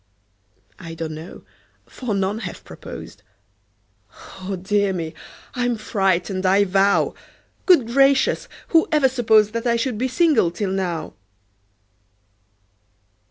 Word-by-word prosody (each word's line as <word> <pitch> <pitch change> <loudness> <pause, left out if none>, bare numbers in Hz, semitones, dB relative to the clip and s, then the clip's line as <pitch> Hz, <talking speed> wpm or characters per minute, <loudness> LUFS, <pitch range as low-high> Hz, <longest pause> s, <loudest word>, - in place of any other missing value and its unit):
I 165 -2 -8
don't 160 -1 -5
know 160 +3 -10 0.4
for 240 -6 -4
none 195 +2 -1
have 190 -6 -7
proposed - - -10 1.2
Oh, 190 +1 -4
dear 195 +2 0
me! 165 -3 -4 0.4
I'm 245 -2 -1
frightened, 190 -3 0
I 195 +2 +4
vow! 195 +1 +2 0.5
Good 350 -10 +6
gracious! 275 - +3 0.2
who 325 -1 +4
ever 300 -4 +4
supposed 220 -4 +3
That 230 +1 -2
I 235 - +3
should 235 -1 -2
be 260 - +1
single 285 - +3
till 190 +3 -3
now? 175 -5 -3
205 Hz, 115 wpm, -21 LUFS, 185-245 Hz, 1.2 s, Good